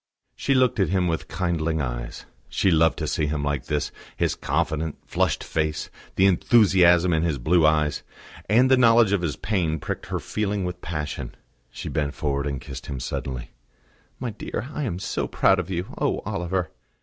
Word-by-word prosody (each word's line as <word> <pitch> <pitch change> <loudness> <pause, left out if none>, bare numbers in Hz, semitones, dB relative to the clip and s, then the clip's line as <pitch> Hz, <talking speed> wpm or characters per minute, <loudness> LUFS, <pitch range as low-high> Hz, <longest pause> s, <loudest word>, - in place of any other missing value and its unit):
She 135 - +1
looked 130 -4 +3
at 95 - +2
him 90 -1 +1
with 80 -1 -2
kindling 80 -3 -1
eyes. - - -4 0.2
She 95 - +2
loved 80 0 +4
to 80 - -2
see 75 0 0
him 75 -1 -2
like 70 -3 -1
this, 75 0 -1 0.3
his - - +1
confident, 80 +1 -1
flushed - - 0
face, 75 -1 -2 0.2
the 95 - +4
enthusiasm 90 -3 +5
in 80 - +2
his 80 -4 0
blue 80 +5 +3
eyes; 75 -2 +1 0.5
and 125 +5 +5
the 130 - +7
knowledge 115 -4 +5
of 100 -3 +2
his 85 -4 -1
pain 85 -7 -1
pricked - - -5
her - - -2
feeling 105 -2 -2
with 90 0 -5
passion. 75 -5 -4 0.3
She - - -7
bent 75 -2 -2
forward 70 -1 -1
and 70 -2 -3
kissed 65 0 -9
him 70 -3 -4
suddenly. 65 +1 -4 0.7
"My 125 -2 -3
dear, 115 +4 -5
I 150 - -2
am 90 -8 -2
so 95 - -2
proud 95 -1 +3
of 95 - -4
you. 90 0 -3
Oh, - - 0
Oliver!" 90 0 -2
85 Hz, 185 wpm, -24 LUFS, 75-95 Hz, 0.7 s, the